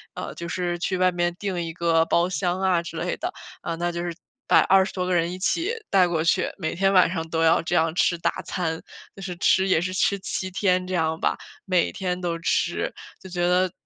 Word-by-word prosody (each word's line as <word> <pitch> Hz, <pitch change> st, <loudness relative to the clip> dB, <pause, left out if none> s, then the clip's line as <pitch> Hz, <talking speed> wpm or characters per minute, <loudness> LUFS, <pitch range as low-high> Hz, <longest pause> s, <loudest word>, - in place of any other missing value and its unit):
呃， -, -, -5 dB
就 170 Hz, -, -6 dB
是 175 Hz, 0 st, -2 dB
去 185 Hz, +2 st, -1 dB
外 185 Hz, 0 st, +3 dB
面 175 Hz, 0 st, 0 dB
订 190 Hz, -4 st, -2 dB
一 165 Hz, -, -4 dB
个 165 Hz, -1 st, +2 dB
包 170 Hz, +1 st, +2 dB
厢 180 Hz, +2 st, -1 dB
啊 185 Hz, -3 st, +2 dB
之 170 Hz, -, -7 dB
类 -, -, -2 dB
的， -, -, -3 dB, 0.3 s
啊， 165 Hz, -, -3 dB
那 175 Hz, +1 st, -1 dB
就 170 Hz, 0 st, -4 dB
是 175 Hz, -, -3 dB, 0.3 s
把 -, -, +6 dB
20 190 Hz, +1 st, +4 dB
多 180 Hz, -1 st, -2 dB
个 185 Hz, -, 0 dB
人 170 Hz, +1 st, +1 dB
一 185 Hz, -, -6 dB
起 345 Hz, -, 0 dB, 0.2 s
带 185 Hz, -2 st, +4 dB
过 165 Hz, -2 st, 0 dB
去， 170 Hz, -, +2 dB
每 160 Hz, -3 st, -3 dB
天 195 Hz, +2 st, +2 dB
晚 185 Hz, -2 st, +6 dB
上 165 Hz, -2 st, -3 dB
都 165 Hz, 0 st, -1 dB
要 165 Hz, 0 st, +4 dB
这 165 Hz, -, -2 dB
样 160 Hz, 0 st, +2 dB
吃 175 Hz, -1 st, +2 dB
大 -, -, -1 dB
餐， 160 Hz, -3 st, -3 dB, 0.3 s
就 195 Hz, -, -11 dB
是 185 Hz, -2 st, -5 dB
吃 190 Hz, +2 st, +3 dB
也 160 Hz, -, +4 dB
是 185 Hz, +2 st, -3 dB
吃 200 Hz, +1 st, +1 dB
7 185 Hz, -1 st, -4 dB
天 185 Hz, -1 st, +1 dB
这 185 Hz, -, -5 dB
样 160 Hz, -2 st, 0 dB
吧， -, -, +1 dB, 0.3 s
每 185 Hz, -3 st, +2 dB
天 180 Hz, -2 st, -2 dB
都 170 Hz, -2 st, -1 dB
吃， -, -, 0 dB, 0.3 s
就 190 Hz, -, -10 dB
觉 175 Hz, 0 st, 0 dB
得， 180 Hz, 0 st, +2 dB
180 Hz, 245 characters per minute, -24 LUFS, 170-185 Hz, 0.3 s, 把